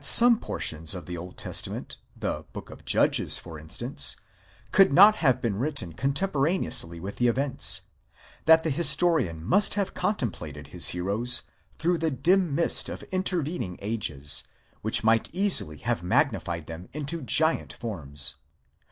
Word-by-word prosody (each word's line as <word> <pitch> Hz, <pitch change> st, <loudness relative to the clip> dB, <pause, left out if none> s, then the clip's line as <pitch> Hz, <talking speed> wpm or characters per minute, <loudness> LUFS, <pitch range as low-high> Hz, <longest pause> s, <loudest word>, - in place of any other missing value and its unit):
some 235 Hz, +9 st, +8 dB
portions 80 Hz, -, -4 dB
of 90 Hz, -, -8 dB
the 90 Hz, -, -6 dB
Old 90 Hz, +2 st, -9 dB
Testament, -, -, -5 dB, 0.2 s
the -, -, -4 dB
Book -, -, -9 dB
of -, -, -14 dB
Judges, -, -, +3 dB
for 80 Hz, -3 st, -9 dB
instance, 80 Hz, +1 st, 0 dB, 0.6 s
could 195 Hz, -1 st, +5 dB
not 205 Hz, +8 st, +7 dB
have 130 Hz, -6 st, +2 dB
been 105 Hz, -4 st, -2 dB
written 135 Hz, -, -4 dB
contemporaneously 140 Hz, -, 0 dB
with 95 Hz, +4 st, -7 dB
the 120 Hz, -, +2 dB
events; 130 Hz, +3 st, 0 dB, 0.6 s
that 160 Hz, 0 st, +6 dB
the 160 Hz, -, -1 dB
historian 155 Hz, -, +3 dB
must 200 Hz, -, +2 dB
have 200 Hz, -2 st, -2 dB
contemplated 75 Hz, -, -4 dB
his 85 Hz, +2 st, +2 dB
heroes 105 Hz, +8 st, 0 dB, 0.3 s
through 170 Hz, +1 st, 0 dB
the 160 Hz, +1 st, 0 dB
dim 170 Hz, +3 st, +1 dB
mist 170 Hz, -, +2 dB
of -, -, -7 dB
intervening 170 Hz, -, -2 dB
ages, 95 Hz, -10 st, -1 dB, 0.4 s
which -, -, +4 dB
might 115 Hz, 0 st, +2 dB
easily 180 Hz, -, +2 dB
have -, -, -2 dB
magnified 85 Hz, -2 st, -1 dB
them 85 Hz, +2 st, -10 dB
into 150 Hz, +3 st, -4 dB
giant 160 Hz, +4 st, +1 dB
forms. 75 Hz, -, -3 dB
125 Hz, 145 wpm, -26 LUFS, -, 0.6 s, some